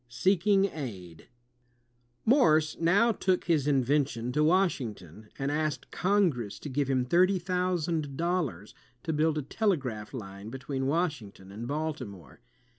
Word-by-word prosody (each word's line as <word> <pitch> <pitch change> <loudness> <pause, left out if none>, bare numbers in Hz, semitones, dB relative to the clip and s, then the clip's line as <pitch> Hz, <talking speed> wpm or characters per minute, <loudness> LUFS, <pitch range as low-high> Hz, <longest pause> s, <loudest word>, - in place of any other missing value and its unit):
Seeking 190 +9 +3
Aid 100 - -7 1.0
Morse 160 - +4
now 200 +8 +4
took 185 -4 0
his 155 -5 +1
invention 135 -3 +1
to 150 +4 +1
Washington 115 - 0
and 135 +1 -1
asked 155 0 -2
Congress 175 - +1
to 150 - -7
give 140 0 -1
him 130 -2 +1
thirty 185 +8 +3
thousand 175 -5 -1
dollars 165 - -2 0.3
to 160 - -2
build 155 +1 +1
a 150 - -1
telegraph 135 - -1
line 100 -4 -8
between 135 +1 -4
Washington 140 - -2
and 110 +4 -6
Baltimore. 135 - -5
150 Hz, 125 wpm, -29 LUFS, 120-175 Hz, 1.0 s, Morse